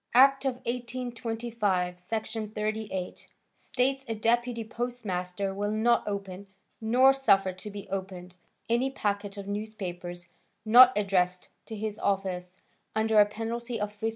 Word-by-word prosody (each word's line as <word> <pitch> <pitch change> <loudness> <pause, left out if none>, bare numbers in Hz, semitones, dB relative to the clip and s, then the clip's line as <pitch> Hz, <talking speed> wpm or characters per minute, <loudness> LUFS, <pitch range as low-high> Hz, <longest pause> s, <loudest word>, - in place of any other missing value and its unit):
Act 270 +2 +6
of 265 -2 +1
1825, 235 -6 -2
Section 220 +3 -4
38, 215 -3 -4 0.3
states 270 +1 -1
a 225 - -2
deputy 235 +2 +1
postmaster 200 -5 -3
will 205 +1 -2
not 220 +3 +2
open, 200 -1 -5 0.3
nor 250 +4 +5
suffer 195 -8 +3
to 185 +3 -8
be 200 -1 -8
opened, 185 -2 -5 0.3
any 240 +3 +2
packet 205 -5 -2
of 200 -1 -7
newspapers, 185 -4 -5 0.4
not 245 +3 +9
addressed 185 -3 +1 0.2
to 220 - -6
his 215 0 -4
office, 185 -2 -1 0.4
under 220 0 +3
a 205 - +7
penalty 230 +2 -4
of 210 0 -3
$50. 220 +2 -1
215 Hz, 130 wpm, -28 LUFS, 195-235 Hz, 0.4 s, not